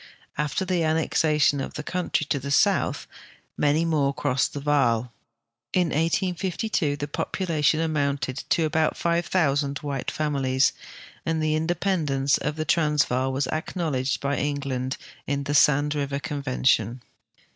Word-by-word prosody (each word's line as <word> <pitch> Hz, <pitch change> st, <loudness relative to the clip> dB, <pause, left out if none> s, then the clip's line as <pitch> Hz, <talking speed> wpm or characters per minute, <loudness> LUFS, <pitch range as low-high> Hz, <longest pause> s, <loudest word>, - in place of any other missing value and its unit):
After 150 Hz, +6 st, -1 dB
the 180 Hz, -2 st, 0 dB
annex 160 Hz, 0 st, +1 dB
ation 150 Hz, -2 st, +3 dB
of -, -, -6 dB
the 150 Hz, -, -4 dB
country 180 Hz, -2 st, -1 dB
to 140 Hz, -, +2 dB
the 140 Hz, +2 st, -6 dB
soutli, 140 Hz, -, +2 dB, 0.5 s
many 150 Hz, +3 st, +2 dB
more 145 Hz, -4 st, +1 dB
crossed 135 Hz, -3 st, 0 dB
the 145 Hz, -, -4 dB
Vaal. 125 Hz, -5 st, +1 dB, 0.6 s
In 180 Hz, -2 st, +2 dB
1852 170 Hz, 0 st, 0 dB
the 145 Hz, -, -4 dB
population 155 Hz, -1 st, 0 dB
amounted 140 Hz, -4 st, -1 dB
to 165 Hz, -, +3 dB
about 155 Hz, 0 st, +1 dB
5,000 160 Hz, -5 st, +1 dB
white 140 Hz, -3 st, -3 dB
families, 135 Hz, -3 st, +1 dB, 0.5 s
and 165 Hz, -1 st, -1 dB
the 155 Hz, 0 st, +1 dB
independence 155 Hz, -4 st, +1 dB
of 150 Hz, -, -2 dB
the 155 Hz, 0 st, -3 dB
Transvaal 150 Hz, -5 st, +2 dB
was 135 Hz, +1 st, 0 dB
acknowledged 155 Hz, -5 st, -2 dB
by 140 Hz, 0 st, -1 dB
England 135 Hz, -3 st, -2 dB, 0.3 s
in 140 Hz, 0 st, -1 dB
the 145 Hz, +1 st, -2 dB
Sand 145 Hz, +1 st, +4 dB
River 140 Hz, -1 st, -2 dB
Convention. 130 Hz, -4 st, 0 dB
145 Hz, 135 wpm, -25 LUFS, 140-160 Hz, 0.6 s, Sand